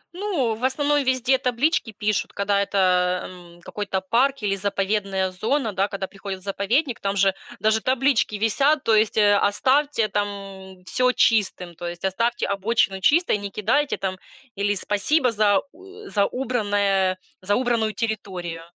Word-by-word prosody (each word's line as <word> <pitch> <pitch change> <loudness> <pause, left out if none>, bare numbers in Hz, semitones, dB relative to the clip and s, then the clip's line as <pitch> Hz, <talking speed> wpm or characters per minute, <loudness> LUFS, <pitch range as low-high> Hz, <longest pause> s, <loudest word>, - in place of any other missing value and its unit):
Ну, 350 - -1
в 225 +3 -9
основном 290 +2 +1
везде 260 0 +1
таблички 250 -1 0
пишут, 210 0 -2
когда 200 0 +1
это, 180 -2 +1
м, 175 -1 -14
какой-то 200 -2 -3
парк 245 +6 +1
или 195 -1 +1
заповедная 195 -1 -1
зона, 225 +4 -1
да. 195 +2 +1
Когда 195 -2 -4
приходят 195 -1 -7
в - - -18
заповедник, 230 +7 -1
там 200 0 -2
же 195 0 +3 0.3
даже 220 0 +2
таблички 260 -4 +1
висят. 275 +8 +2
То 225 - +2
есть, 215 0 +2
э: 205 -1 +5
"Оставьте 260 +3 +2
там 195 -2 -5
всё 250 +7 +2
чистым". 190 -6 +1
То 175 +1 -7
есть: 175 +2 -6
"Оставьте 230 +5 0
обочину 200 -1 0
чистой, 315 - +3
не 200 0 -5
кидайте 245 +9 0
там", 185 -1 -3 0.4
или: 205 +1 0
"Спасибо 235 +8 +1
за 205 -2 +3
у 390 +4 -14
за 200 -1 +2
убранное 205 -7 0 0.2
за 205 +2 0
убранную 235 -4 0
территорию". 185 -7 -4
205 Hz, 155 wpm, -23 LUFS, 195-250 Hz, 0.4 s, э